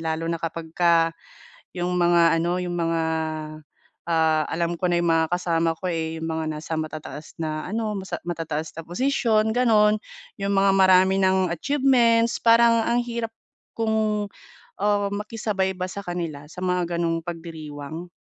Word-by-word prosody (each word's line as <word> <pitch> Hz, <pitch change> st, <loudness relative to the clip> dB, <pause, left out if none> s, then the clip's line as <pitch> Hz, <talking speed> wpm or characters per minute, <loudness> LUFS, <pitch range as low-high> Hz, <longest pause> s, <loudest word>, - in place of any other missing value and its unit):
lalo 160 Hz, 0 st, -2 dB
na 165 Hz, -1 st, -2 dB
kapagka 165 Hz, 0 st, +1 dB, 0.6 s
yung 180 Hz, 0 st, -1 dB
mga 170 Hz, -1 st, +4 dB
ano, 175 Hz, +2 st, 0 dB
yung 175 Hz, -1 st, -3 dB
mga, 165 Hz, -1 st, 0 dB, 1.1 s
ah, 160 Hz, -1 st, +3 dB
alam 170 Hz, +1 st, -1 dB
ko 180 Hz, -, +1 dB
na 175 Hz, -, +2 dB
yung 170 Hz, -, +1 dB
mga 160 Hz, 0 st, +2 dB
kasama 165 Hz, -2 st, 0 dB
ko, 185 Hz, -, -3 dB
eh, 160 Hz, -1 st, -3 dB
yung 160 Hz, -, -4 dB
mga 160 Hz, 0 st, -2 dB
nasa 160 Hz, +1 st, -4 dB
matataas 155 Hz, -1 st, -7 dB
na 155 Hz, -1 st, -3 dB
ano, 220 Hz, +1 st, -2 dB
masa 190 Hz, 0 st, -5 dB
matataas 160 Hz, -2 st, -3 dB
na 165 Hz, -, -5 dB
posisyon, 220 Hz, 0 st, +1 dB
gano'n, 215 Hz, -4 st, +4 dB, 0.4 s
yung 200 Hz, 0 st, 0 dB
mga 195 Hz, 0 st, +4 dB
marami 190 Hz, 0 st, +5 dB
ng 190 Hz, -1 st, +3 dB
achievements. 235 Hz, -, +2 dB
Parang 230 Hz, 0 st, +5 dB
ang 235 Hz, +1 st, +2 dB
hirap 235 Hz, -1 st, -4 dB, 0.5 s
kong, 220 Hz, -2 st, 0 dB, 0.5 s
ah, 205 Hz, -1 st, +2 dB
makisabay 210 Hz, -2 st, -2 dB
ba 185 Hz, 0 st, -2 dB
sa 200 Hz, -, -6 dB
kanila 165 Hz, -5 st, -5 dB
sa 180 Hz, -, -9 dB
mga 180 Hz, -1 st, 0 dB
gano'ng 165 Hz, -1 st, 0 dB
pagdiriwang. 160 Hz, -1 st, -7 dB
175 Hz, 150 wpm, -24 LUFS, 165-210 Hz, 1.1 s, marami